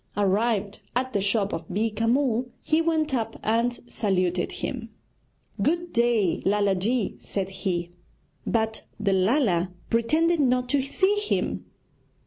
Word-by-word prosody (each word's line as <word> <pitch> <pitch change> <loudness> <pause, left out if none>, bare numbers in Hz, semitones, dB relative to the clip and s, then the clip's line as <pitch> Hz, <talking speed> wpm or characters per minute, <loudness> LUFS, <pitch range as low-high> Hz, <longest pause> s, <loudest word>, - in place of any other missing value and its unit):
Arrived 205 +1 +1 0.2
at 255 +1 -1
the 200 - +1
shop 200 0 +1
of 165 -1 -4
Beeka 220 +3 0
Mull, 250 -2 +2 0.2
he 315 +1 +2
went 315 -3 +1
up 230 -4 -1
and 230 +2 +1
saluted 185 -5 0
him. 235 -3 -4 0.7
'Good 345 +2 0
day, 235 -6 +2
Lala 205 0 +2
ji,' 215 +5 -1
said 195 -1 -3
he. 175 -3 -2 0.6
But 220 -1 0 0.2
the 200 -2 +1
Lala 190 - +2 0.2
pretended 315 +9 +2
not 250 -2 +2
to 280 +1 +3
see 380 +9 +1
him. 415 - -1
225 Hz, 130 wpm, -26 LUFS, 195-260 Hz, 0.7 s, to